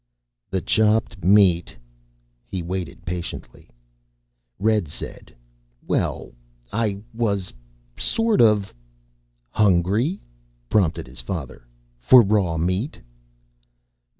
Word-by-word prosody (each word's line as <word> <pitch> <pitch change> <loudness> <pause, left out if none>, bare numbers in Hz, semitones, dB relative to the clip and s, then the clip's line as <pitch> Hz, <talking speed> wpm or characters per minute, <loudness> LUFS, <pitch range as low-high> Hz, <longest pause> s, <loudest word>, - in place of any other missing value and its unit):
"The 95 -1 -1
chopped 110 -1 +1
meat." 95 -5 +4 0.7
He 95 -3 -4
waited 90 0 -5
patiently. 85 -8 -7 0.9
Red 105 -4 +1
said, 75 - -8 0.5
"Well, - - -2 0.4
I 105 -3 -1
was 100 - -1 0.5
sort 225 - +2
of 105 -3 +3 0.4
" - - -44
"Hungry?" 105 - +2 0.5
prompted 95 -7 +1
his 65 0 -10
father. 65 -4 -6 0.3
"For 120 - +7
raw 95 -5 +1
meat?" 90 - -1
95 Hz, 90 wpm, -23 LUFS, 85-110 Hz, 0.9 s, For